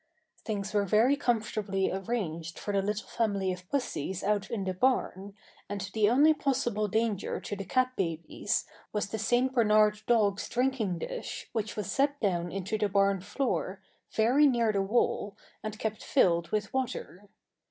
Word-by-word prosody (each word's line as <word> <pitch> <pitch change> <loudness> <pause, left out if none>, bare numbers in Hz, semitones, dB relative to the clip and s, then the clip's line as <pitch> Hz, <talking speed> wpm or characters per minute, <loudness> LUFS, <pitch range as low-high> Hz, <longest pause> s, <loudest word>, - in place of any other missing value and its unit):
Things 205 -3 -3
were 205 -1 +3
very 220 +8 +4
comfortably 215 -7 0
arranged 180 -5 -3
for 205 - -4
the 200 - +2
little 210 +2 -2
family 200 -5 0
of 180 0 -11
pussies 190 - -2
out 205 0 0
in 220 -4 -2
the 190 0 -2
barn, 200 -3 0 0.3
and 205 0 -3
the 215 -2 +3
only 290 +6 +6
possible 245 -7 0
danger 220 -1 -1
to 205 - -5
the 195 -1 -6
cat 255 +1 +1
babies 165 -3 -1 0.3
was 210 -2 -2
the 220 - -4
St. 245 +5 +2
Bernard 215 -3 +4
dog's 210 -4 +2
drinking 245 -8 0
dish - - -6
which 220 -2 -2
was 205 -2 -3
set 285 +3 +1
down 175 -4 0
into 195 +3 -3
the 210 -1 +1
barn 195 0 +3
floor, 200 -3 -2 0.3
very 250 +7 +4
near 235 -4 +2
the 200 -2 +1
wall, 200 -1 0 0.2
and 215 0 -5
kept 215 -1 -3
filled 170 -9 +2
with 210 +2 -2
water. 240 -6 -4
210 Hz, 165 wpm, -29 LUFS, 195-240 Hz, 0.3 s, only